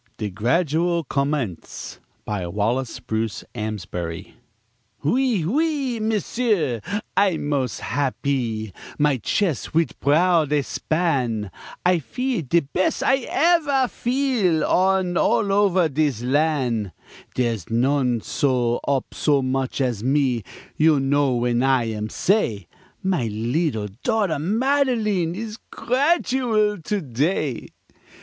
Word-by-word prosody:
] - - -41
DE 105 -3 -3
GRADUAL 165 - +1
COMMENCE 140 - -3 0.3
BY 100 -4 -3
WALLACE 110 +7 -1
BRUCE 110 -1 -3
AMSBARY 95 -5 -5 0.7
Oui, 235 - +1
Oui, 275 - 0
M'sieu, 215 - 0 0.4
I'm 190 -7 +2
mos' 130 -6 -1
happee, 125 -6 -2 0.2
My 145 -2 +2
ches' 155 - -1
wid 165 -5 +2
proud 160 +1 +3
expan', 140 - 0 0.3
I 180 -1 +4
feel 250 - -2
de 165 +4 +2
bes' 155 +6 -1
I 265 -2 +2
evere 300 -5 +3
feel, 240 - +1
An' 185 -1 +2
over 200 -3 +3
all 165 - +3
dis 140 -5 0
lan' 130 - 0 0.4
Dere's 115 -7 -1
none 125 0 +1
set 125 -4 0
op 140 -2 -1
so 145 -3 +2
moch 130 +1 -1
as 120 -6 -1
me; 130 -3 +1 0.4
You'll 155 -2 +4
know 135 -1 +2
w'en 120 0 +1
I 130 -2 +3
am 105 0 -4
say 110 - 0 0.4
My 180 -11 0
leddle 110 +1 -1
daughter 200 -9 +1
Madeline 215 - +1
Is 220 +1 -5
gradual 250 - +1
to 205 +5 -2
day. 140 0 -1
145 Hz, 115 wpm, -23 LUFS, 120-195 Hz, 0.7 s, I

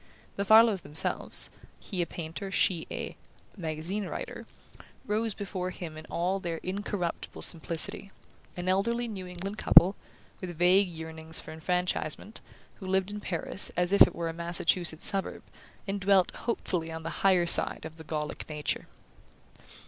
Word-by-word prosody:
The 200 - -2
Farlows 220 -2 +6
themselves 150 +2 0 0.3
he 185 -4 -3
a 170 - -1
painter, 170 +4 -6
she 180 -3 +1
a - - -5 0.4
"magazine 175 +3 -3
writer" - - -6 0.6
rose 215 0 0
before 190 -2 -4
him 170 -3 -7
in 155 0 -10
all 185 +3 -1
their 170 -3 -3
incorruptible 190 -2 -3
simplicity: 165 +3 -2 0.5
an 175 +1 -4
elderly 235 +6 +1
New 190 -5 -6
England 190 +4 -6
couple, 185 +3 +7 0.4
with 175 -3 -6
vague 180 +3 +4
yearnings 160 -1 -2
for - - -8
enfranchisement, 180 +4 -2 0.4
who 190 - -7
lived 190 +1 +1
in 210 - -5
Paris 185 +1 -2
as 180 +2 +2
if 200 - +3
it - - +8
were 170 - -2
a 165 - -3
Massachusetts 170 0 +1
suburb, 195 -2 -1 0.4
and 195 0 -2
dwelt 190 -1 +4
hopefully 180 -8 -3
on 160 0 -6
the 165 - -4
"higher 185 -3 +4
side" 170 - +5
of 160 0 -8
the 160 - -9
Gallic 150 0 -4
nature. 150 -1 -3
180 Hz, 150 wpm, -29 LUFS, 165-195 Hz, 0.6 s, it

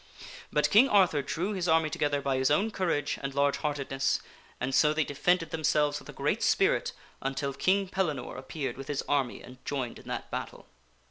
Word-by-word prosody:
But - - +2
King 245 +6 +7
Arthur 185 -9 +4
drew 180 +8 -2
his 180 -3 -2
army 160 -1 +3
together 145 -1 0
by 135 -1 +1
his 130 0 +2
own 200 +10 +2
courage 170 -7 -1
and 135 -1 -4
large 140 0 +2
heartedness, 140 -2 -1 0.4
and 130 +2 -2
so 150 +2 +4
they 160 - +2
defended 165 +5 0
themselves 150 -2 +1
with - - -15
a - - -5
great - - -1
spirit - - +2 0.3
until 135 +1 -2
King 195 +6 +2
Pellinore 155 -9 -2
appeared 130 -1 -5
with 135 0 -8
his 145 -1 -2
army 135 -4 -1
and 125 0 -13
joined 130 -4 -3
in - - -15
that - - -5
battle. - - -5
145 Hz, 190 wpm, -29 LUFS, 135-165 Hz, 0.4 s, King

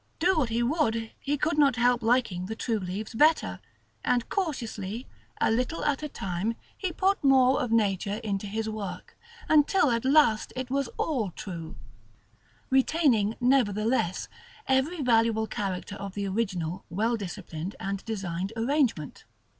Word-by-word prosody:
Do 365 +4 +3
what 255 -6 +1
he 230 +1 0
would, 230 -5 0
he 290 +1 -1
could 305 +2 0
not 280 -4 +5
help 245 0 +3
liking 225 -6 +1
the 220 - -4
true 225 -1 -1
leaves 195 +5 -5
better; 305 +7 +3 0.4
and 245 -2 +1
cautiously, 240 - -3 0.3
a - - +3
little 250 +8 -1
at 290 -1 +1
a 300 - -4
time, 195 +1 -3 0.2
he 375 -2 -3
put 380 +2 +1
more 265 -1 +5
of 245 - -2
nature 200 -3 +1
into 205 -1 -2
his 220 +2 -3
work, 215 -3 -6 0.3
until 300 0 +4
at 230 -1 0
last 265 -5 +3
it 255 -1 -4
was 275 -1 0
all 250 - 0
true, 170 -2 -7 1.0
retaining, 260 -6 +3
nevertheless, 225 -6 +1 0.4
every 280 +5 +1
valuable 225 -2 +3
character 200 -2 -4
of 200 -2 -7
the 200 -1 -2
original 190 -5 -2
well 220 +7 0
disciplined 185 -3 -6
and 195 0 -3
designed 190 -3 -3
arrangement. 235 - 0
230 Hz, 145 wpm, -27 LUFS, 200-270 Hz, 1.0 s, not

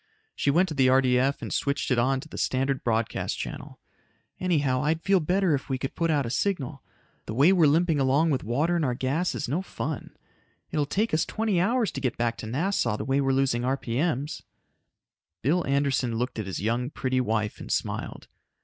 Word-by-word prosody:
She - - 0
went 175 +6 +4
to - - -3
the 135 -3 +3
RDF 130 +1 +3
and - - -4
switched 140 -1 -1
it 125 - +3
on 130 +2 +2
to 155 - -11
the - - -8
standard 135 +1 0
broadcast 115 -1 -1
channel. - - -7 0.6
"Anyhow, 145 -8 +1
I'd 160 +3 0
feel 195 -1 +4
better 180 +1 +1
if 140 0 -2
we 130 - 0
could 135 +1 -4
put 170 -1 0
out 145 -4 +2
a 115 - -4
signal. 140 -5 -1 0.5
The 110 - -4
way 145 +9 +5
we're 170 -5 +5
limping 160 +1 +2
along 140 +5 +3
with 130 - 0
water 145 +10 +1
in 170 - +1
our 125 -4 0
gas 140 +8 -1
is - - -3
no 150 +9 -1
fun. 160 -6 -5 0.5
It - - -3
will 145 - +1
take 215 +6 0
us 155 - +3
twenty 215 -5 0
hours 230 +3 +1
to 135 - -5
get 125 -3 -1
back 120 -1 0
to 110 - -7
Nassau 130 - 0
the - - -4
way 135 +1 +1
we're 135 -1 +1
losing 135 -3 +1
RPM'S." 135 +4 -1 1.0
Bill 165 +8 +2
Anderson 135 -4 +1
looked 125 0 -2
at 105 - -4
his 95 - -4
young, 120 +5 -1
pretty 130 -3 -1
wife 110 -3 -1
and - - -7
smiled. - - -3
140 Hz, 205 wpm, -26 LUFS, 125-160 Hz, 1.0 s, way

